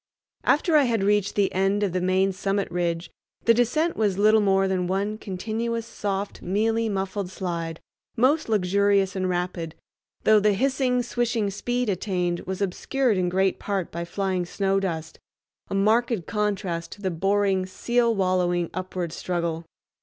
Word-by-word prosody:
After 315 +2 +3
I 290 - +5
had 225 -5 +1
reached 205 0 +2
the 200 -2 +1
end 195 +2 +1
of 195 -4 0
the 185 - 0
main 190 +1 +2
summit 195 +1 -1
ridge 170 -1 -2 0.3
the 230 - +6
descent 305 +9 +1
was 205 -4 +1
but 200 - -2
little 215 0 +6
more 195 -1 +3
than 185 -2 0
one 200 +3 -1
continuous 225 +4 -3
soft, 200 -3 -4
mealy, 225 +4 0
muffled 195 -1 -2
slide, 170 -3 -4 0.4
most 270 +4 +2
luxurious 200 -1 +2
and 185 -1 -1
rapid, 175 -2 -3 0.5
though 215 -1 +6
the 210 0 +3
hissing, 255 +2 +1
swishing 235 -4 -1
speed 245 +5 -2
attained 180 -3 -1
was 190 +1 -2
obscured 240 +5 0
in 180 -1 +1
great 190 +1 +1
part 195 -4 -2
by 170 +1 -4
flying 185 0 -1
snow 195 +2 0
dust—a 170 +1 -7
marked 220 -1 +2
contrast 200 -5 -2
to 205 - -14
the 190 - 0
boring 195 +2 +1
seal 235 +4 +1
wallowing 180 -3 +1
upward 185 -2 -4
struggle. 170 -2 -2
195 Hz, 155 wpm, -25 LUFS, 185-215 Hz, 0.5 s, the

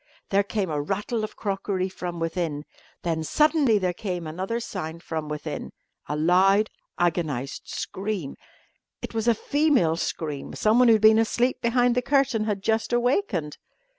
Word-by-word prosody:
There 200 0 +4
came 200 -3 -2
a 150 -1 -1
rattle 205 +7 -2
of 215 - -5
crockery 195 -2 -2
from 180 -2 -6
within. 165 -3 -2 0.4
Then 165 -2 -1
suddenly 300 - +3
there 185 -3 0
came 180 -2 -4
another 185 +9 -3
sound 165 -7 -6
from 155 -2 -4
within 150 0 -5 0.4
a 150 - -1
loud, 190 +6 +4 0.3
agonised 155 -6 -1
scream. 190 -7 -4 0.7
It - - -5
was 225 0 -1
a 235 - +5
female 275 - +2
scream. 150 -4 -4
Someone 235 +4 +4
who 225 - +7
had 215 - -1
been 220 0 +7
asleep 240 +3 +1
behind 245 +1 +3
the 250 - +1
curtain 270 -4 +2
had 205 -3 -2
just 220 +1 0
awakened. 240 - 0
195 Hz, 155 wpm, -25 LUFS, 165-230 Hz, 0.7 s, who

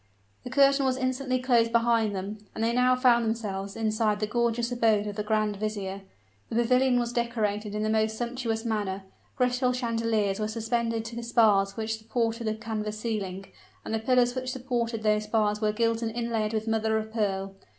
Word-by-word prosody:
The - - -6
curtain 275 +1 +4
was 260 -1 +1
instantly 255 0 -1
closed 240 -3 +2
behind 230 -3 +2
them; 200 +3 -5 0.2
and 220 - -2
they 230 +1 +2
now 250 +1 +4
found 245 -2 +4
themselves 200 -3 -3
inside 215 -1 0
the 210 - 0
gorgeous 235 +1 0
abode 225 -4 +2
of 205 -1 -5
the 210 - -2
grand 210 -1 0
vizier. 200 -2 -3 0.5
The - - -4
pavilion 250 +2 +3
was 240 0 -1
decorated 215 -3 -1
in 210 - -1
the 215 - 0
most 220 0 +1
sumptuous 235 -1 -3
manner. 205 -4 -2 0.3
Crystal 250 0 +2
chandeliers 230 -4 0
were 215 - 0
suspended 230 0 -1
to 230 +1 -7
the 235 - -4
spars 210 -4 +3
which 220 0 -2
supported 230 +1 -2
the 215 - 0
canvas 215 -1 -4
ceiling; 200 -4 -3 0.4
and - - -4
the 220 - +1
pillars 245 +1 +3
which 255 0 -3
supported 240 -3 -2
those 210 0 +2
spars 210 -1 +1
were 215 -1 +2
gilt 230 +1 0
and 230 - -1
inlaid 225 -2 -1
with 220 0 -2
mother 220 0 +1
of 220 0 -5
pearl. 195 -3 -1
225 Hz, 190 wpm, -27 LUFS, 215-240 Hz, 0.5 s, curtain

